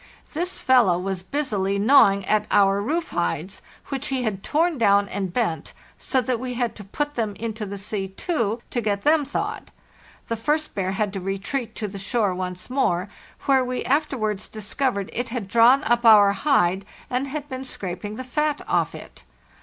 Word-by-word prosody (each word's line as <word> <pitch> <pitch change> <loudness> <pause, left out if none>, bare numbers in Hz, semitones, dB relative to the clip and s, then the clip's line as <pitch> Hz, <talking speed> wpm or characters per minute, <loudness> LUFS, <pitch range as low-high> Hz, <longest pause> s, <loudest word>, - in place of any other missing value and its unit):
This 350 +4 -2
fellow 240 -9 +4
was 185 0 -3
busily 200 -5 -1
gnawing 200 -4 +5
at 210 +1 +1
our 200 0 +4
roof 315 +9 -1
hides, 175 +1 -2 0.3
which 275 +1 -2
he 265 -3 -1
had 205 -4 -2
torn 320 - +1
down 200 -2 +4
and 190 -2 -3
bent, 170 -9 -2 0.3
so 260 - +1
that 250 -1 -1
we 250 0 -4
had 240 -2 -1
to 210 - -8
put 290 +9 -3
them 220 -5 -2
into 220 -1 -4
the 200 +1 -6
sea 195 0 -3
too, 225 - -2
to 240 - -1
get 205 -2 -1
them 305 0 +4
thawed. 280 - -4 0.6
The 230 - -1
first 300 +7 -1
bear 190 -1 -1
had 200 0 -1
to 195 - -3
retreat 195 +6 -3
to 215 - -3
the 200 0 -8
shore 205 -1 0
once 180 0 -5
more, 205 -8 0 0.3
where 265 -2 +3
we 250 0 -3
after 285 0 +1
wards 210 -3 -2
discovered 215 -1 -2
it 245 +1 -2
had 230 -4 -4
drawn 235 +6 +5
up 240 +1 +2
our 210 -3 +7
hide 195 -9 +2 0.3
and_ 255 +2 0
had 290 +1 -5
been 260 -2 -5
scraping 200 -4 -5
the 255 - -5
fat 300 +3 -1
off - - +1
it. - - -12
220 Hz, 185 wpm, -23 LUFS, 195-265 Hz, 0.6 s, our